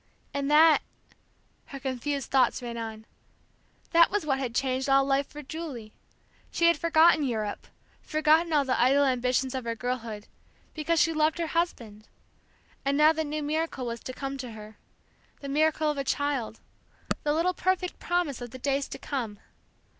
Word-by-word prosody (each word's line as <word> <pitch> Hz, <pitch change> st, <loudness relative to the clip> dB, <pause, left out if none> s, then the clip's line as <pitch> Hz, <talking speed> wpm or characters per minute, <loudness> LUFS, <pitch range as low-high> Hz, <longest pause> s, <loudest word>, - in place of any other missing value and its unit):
And 280 Hz, 0 st, -2 dB
that 310 Hz, +1 st, +6 dB, 0.8 s
her 275 Hz, -, -9 dB
confused 270 Hz, +1 st, -3 dB
thoughts 265 Hz, -1 st, +2 dB
ran 235 Hz, -1 st, -5 dB
on 220 Hz, -1 st, -6 dB, 0.9 s
that 335 Hz, 0 st, +6 dB
was 415 Hz, -4 st, -1 dB
what 270 Hz, -3 st, 0 dB
had 245 Hz, -3 st, -4 dB
changed 260 Hz, +1 st, 0 dB
all 270 Hz, 0 st, +5 dB
life 275 Hz, 0 st, +1 dB
for 295 Hz, 0 st, -10 dB
Julie. 270 Hz, -8 st, -7 dB, 0.6 s
She 340 Hz, -, 0 dB
had 335 Hz, 0 st, +6 dB
forgotten 330 Hz, -1 st, +5 dB
Europe, 220 Hz, -6 st, -3 dB, 0.3 s
forgotten 315 Hz, +2 st, +2 dB
all 290 Hz, -3 st, +3 dB
the 255 Hz, -2 st, +1 dB
idle 275 Hz, +3 st, +4 dB
ambitions 255 Hz, 0 st, 0 dB
of 260 Hz, -1 st, -3 dB
her 230 Hz, 0 st, -2 dB
girlhood, 230 Hz, -3 st, -4 dB, 0.5 s
because 320 Hz, +1 st, 0 dB
she 330 Hz, -, +3 dB
loved 310 Hz, 0 st, +1 dB
her 340 Hz, -, -1 dB
husband; 230 Hz, -11 st, -2 dB, 0.8 s
and 275 Hz, +1 st, +1 dB
now 305 Hz, +1 st, +6 dB
the 320 Hz, 0 st, -1 dB
new 300 Hz, 0 st, -3 dB
miracle 305 Hz, -3 st, -2 dB
was 235 Hz, 0 st, -4 dB
to 255 Hz, -, -7 dB
come 275 Hz, +1 st, -5 dB
to 250 Hz, -3 st, -6 dB
her, 215 Hz, 0 st, -11 dB, 0.6 s
the 280 Hz, -, -8 dB
miracle 310 Hz, +1 st, +2 dB
of 290 Hz, -, -5 dB
a -, -, -1 dB
child, 275 Hz, -6 st, -2 dB, 0.6 s
the 295 Hz, -, 0 dB
little 335 Hz, +4 st, +1 dB
perfect 365 Hz, 0 st, -1 dB
promise 345 Hz, -7 st, -1 dB
of 240 Hz, -, -6 dB
the 260 Hz, -, -9 dB
days 275 Hz, +1 st, -1 dB
to -, -, -7 dB
come. 235 Hz, -7 st, -4 dB
275 Hz, 170 wpm, -27 LUFS, 250-310 Hz, 0.9 s, that